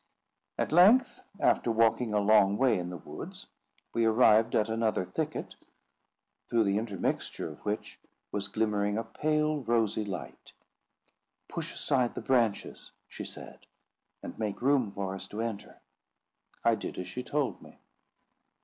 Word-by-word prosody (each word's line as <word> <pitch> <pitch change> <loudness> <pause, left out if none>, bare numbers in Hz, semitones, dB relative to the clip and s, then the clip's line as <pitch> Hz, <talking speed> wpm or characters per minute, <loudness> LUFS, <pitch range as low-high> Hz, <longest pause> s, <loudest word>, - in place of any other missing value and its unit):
At - - -1
length, 210 +10 +6 0.2
after 120 - +2
walking 115 +1 +2
a 105 - +1
long 100 -1 +4
way 130 -5 +3
in 90 0 -4
the 90 - -6
woods, 75 - -9 0.5
we 115 - +1
arrived 110 0 +4
at 105 - +3
another 110 -4 0
thicket, - - -4 1.0
through 115 -1 +3
the 100 -1 +1
intertexture 100 -6 -3
of 75 - -13
which 105 +1 -4 0.3
was 100 -1 -2
glimmering 105 -1 0
a 115 - -1
pale 150 +5 0
rosy 115 -4 +1
light. 80 -11 -7 0.9
"Push - - -5
aside 125 -3 0
the - - -4
branches," 120 -6 0 0.2
she - - -8
said, - - -9 0.6
"and - - -8
make 105 -2 -2
room 130 -6 +3
for 95 -1 -4
us 95 0 -7
to 105 - -7
enter." 115 -3 -5 0.8
I 115 - +4
did 110 - -5
as 90 - -4
she 110 +8 -5
told 140 +1 -2
me. - - -15
110 Hz, 145 wpm, -30 LUFS, 100-120 Hz, 1.0 s, length